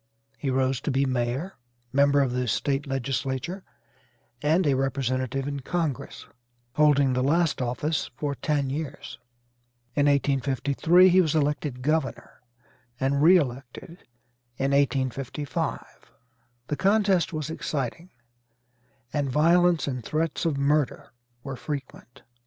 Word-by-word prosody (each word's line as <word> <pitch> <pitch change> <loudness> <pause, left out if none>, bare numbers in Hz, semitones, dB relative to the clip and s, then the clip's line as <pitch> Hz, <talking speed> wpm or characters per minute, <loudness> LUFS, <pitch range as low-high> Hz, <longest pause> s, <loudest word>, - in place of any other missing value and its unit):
He 140 - -2
rose 130 -1 0
to - - -3
be 135 0 +2
mayor, 130 +8 -2 0.4
member 140 +1 +4
of 135 -3 +1
the 125 0 -1
State 140 +5 -1
legislature, 135 +6 -3 0.8
and 160 +5 +2
a 145 - +3
representative 130 0 -1
in 140 -1 -3
Congress, 155 -1 -3 0.5
holding 140 -2 +4
the 125 - 0
last 160 +2 +1
office 140 +5 -1
for 145 +2 -2
ten 140 -1 -1
years. 145 -2 -6 0.7
In 145 +1 +2
1853 140 +5 +3
he 185 +1 +5
was 160 -3 0
elected 145 -4 -1
governor, 155 -1 -2 0.6
and 140 +1 +1
re 175 +5 +7
elected 135 +3 -5 0.5
in 135 +1 0
1855. 140 0 -2 0.5
The 150 - -2
contest 195 -3 +2
was 155 -1 -4
exciting, 155 +3 -4 1.0
and 145 -2 0
violence 170 +3 +3
and 125 -3 -3
threats 155 +6 -2
of 155 -4 0
murder 145 0 0 0.3
were 135 -1 -5
frequent. 135 -3 -7
140 Hz, 120 wpm, -26 LUFS, 130-155 Hz, 1.0 s, re